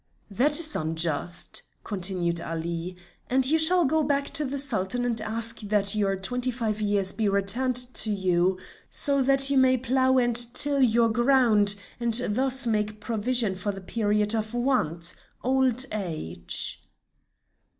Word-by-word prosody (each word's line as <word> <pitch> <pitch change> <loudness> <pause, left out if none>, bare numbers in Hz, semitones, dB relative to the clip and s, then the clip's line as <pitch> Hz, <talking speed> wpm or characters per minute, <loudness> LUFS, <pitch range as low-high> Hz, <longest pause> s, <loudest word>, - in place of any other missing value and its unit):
"That 285 - +2
is 310 -2 +1
unjust," 160 +1 -2 0.2
continued 180 -4 -1
Ali, 170 +2 -6 0.3
"and 260 +1 +3
you 315 +4 +3
shall 350 +2 +4
go 315 +4 +1
back 280 -1 -1
to 310 -2 +2
the 280 +1 -5
Sultan 245 -3 -2
and 230 -2 -2
ask 225 +1 0
that 205 -1 +2
your 200 -2 -1
twenty 245 +7 -1
five 225 -3 -3
years 205 -2 0
be 215 -2 -2
returned 200 +6 0
to 245 -2 0
you 185 -2 0 0.3
so 280 -2 +4
that 275 +1 +4
you 275 - +3
may 260 0 +3
plough 260 +1 0
and 240 -2 +1 0.2
till 285 -1 +2
your 235 -2 +3
ground, 230 -4 +2 0.2
and 235 -1 +3
thus 260 +3 +1
make 210 -2 -2
provision 225 -1 -1
for 185 +2 -3
the 195 - -9
period 210 +1 -1
of 220 +1 -4
want, 180 - -1 0.3
old 260 0 +1
age." 155 - -2
225 Hz, 150 wpm, -25 LUFS, 195-260 Hz, 0.3 s, shall